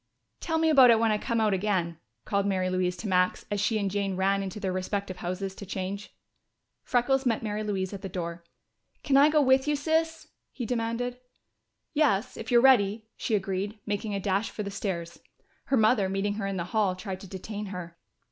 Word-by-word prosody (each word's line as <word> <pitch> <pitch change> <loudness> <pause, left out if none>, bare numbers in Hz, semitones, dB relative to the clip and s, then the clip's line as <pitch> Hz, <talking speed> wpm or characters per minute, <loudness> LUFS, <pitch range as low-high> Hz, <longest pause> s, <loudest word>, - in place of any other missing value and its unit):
"Tell 325 -2 -1
me 320 0 +3
about 265 -4 +8
it 230 - +7
when 225 0 +2
I 210 - +1
come 230 +1 -1
out 215 -2 +2
again," 185 -4 -1 0.3
called 200 0 0
Mary 185 -2 0
Louise 180 -1 0
to 220 - -5
Max 180 -1 +1
as 205 -1 0
she 220 +1 +1
and 200 -2 -1
Jane 200 -1 -1
ran 195 +1 +1
into 195 +1 -5
their 190 -3 -2
respective 185 0 -3
houses 185 +2 -4
to 200 - -10
change. 195 +1 -5 0.7
Freckles 265 +2 +1
met 230 -4 0
Mary 210 -1 -2
Louise 195 -2 -2
at 195 - -6
the 195 - -5
door. 170 -2 -5 0.6
"Can 275 - +2
I 285 +2 +7
go 300 -1 +4
with 265 +1 +4
you, 295 - +2
Sis?" 320 +2 -1 0.2
he 245 - -5
demanded. 245 +1 -2 0.7
"Yes, 255 -7 +2
if 225 - -7
you're 240 -1 +5
ready," 220 -5 +4
she 225 - -1
agreed, 195 +1 -2
making 205 0 -2
a - - -1
dash 195 +2 0
for 210 - -5
the 200 - -5
stairs. 175 -4 -4 0.5
Her 270 - +2
mother, 215 -3 +3
meeting 195 +1 -1
her 205 -1 -3
in 195 -1 -3
the 170 - -1
hall, 205 -4 +2
tried 185 0 -6
to 195 - -10
detain 205 +3 -6
her. 175 -3 -8
205 Hz, 205 wpm, -28 LUFS, 190-230 Hz, 0.7 s, about